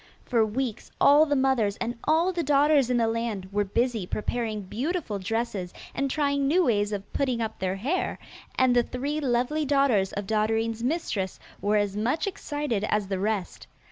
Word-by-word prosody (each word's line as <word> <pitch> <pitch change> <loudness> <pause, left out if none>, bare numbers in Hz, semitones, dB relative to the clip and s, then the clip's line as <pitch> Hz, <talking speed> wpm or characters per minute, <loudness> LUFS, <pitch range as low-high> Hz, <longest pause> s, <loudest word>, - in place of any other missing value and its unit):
For 235 -3 +2
weeks 230 +1 -3
all 295 +2 +6
the 290 - +1
mothers 260 -7 +2
and 235 - -2
all 330 +4 +3
the 345 - -1
daughters 285 -2 +3
in 250 - +2
the 230 -1 +2
land 225 -4 -2
were 205 +1 +1
busy 225 0 -1
preparing 215 0 -2
beautiful 245 - -3
dresses 200 -2 -3 0.2
and 275 0 -1
trying 280 -1 +1
new 355 +6 +4
ways 205 -4 +1
of 200 -1 -5
putting 260 -4 0
up 220 -1 -3
their 190 0 -1
hair, 280 - -1 0.4
and 255 -1 +3
the 240 - +6
three 275 +5 -3
lovely 265 +3 0
daughters 275 -9 +2
of 205 0 -3
Dotterine's 220 +2 0
mistress 240 - -2 0.2
were 210 +1 +2
as 205 -1 0
much 245 +9 0
excited 290 - -3
as 210 -2 0
the 190 -2 -1
rest. 205 -2 -2
235 Hz, 175 wpm, -26 LUFS, 210-280 Hz, 0.4 s, all